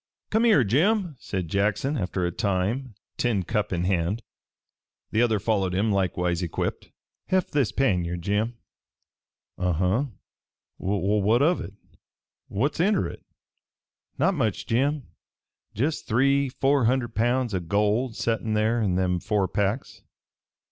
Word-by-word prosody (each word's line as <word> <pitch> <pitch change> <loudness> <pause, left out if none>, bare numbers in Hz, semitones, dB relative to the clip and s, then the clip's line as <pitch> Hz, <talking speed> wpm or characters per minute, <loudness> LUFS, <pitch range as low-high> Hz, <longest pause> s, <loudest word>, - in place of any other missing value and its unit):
"Come 220 +2 +3
here, 210 - +5
Jim," 170 - +2
said 95 -4 -4
Jackson 105 - 0
after 90 -5 -1
a 85 - -1
time, 100 +7 -1 0.2
tin 110 -6 +1
cup 105 +4 -1
in 90 -1 -1
hand. 95 +4 0 0.9
The 110 - +2
other 115 -3 +3
followed 95 -3 0
him, 105 +3 +1
likewise 90 -2 0
equipped. 85 -3 -3 0.4
"Heft 185 -1 +1
this 135 -7 +1
pannier, 90 -9 +1
Jim." 105 +6 -1 1.0
"Uh 90 -1 +1
huh? 95 - +1 0.7
Well, 100 +2 0
what 115 +6 +3
of 170 +4 +3
hit? 100 - -7 0.7
What's 140 +10 -1
inter 195 +2 +2
hit?" - - -11 0.9
"Not 185 +8 +3
much, 115 - -1
Jim. 140 +5 +1 0.7
Jest 145 +9 -1
three 140 +4 +3
four 135 0 +2
hunderd 120 -1 +1
pounds 120 +1 +1
o' 95 - +1
gold 105 +7 0
settin' 115 -1 -1
there 110 +2 +2
in 95 -4 +1
them 90 -1 +1
four 105 0 0
packs. 100 +6 -2
110 Hz, 135 wpm, -25 LUFS, 95-130 Hz, 1.0 s, here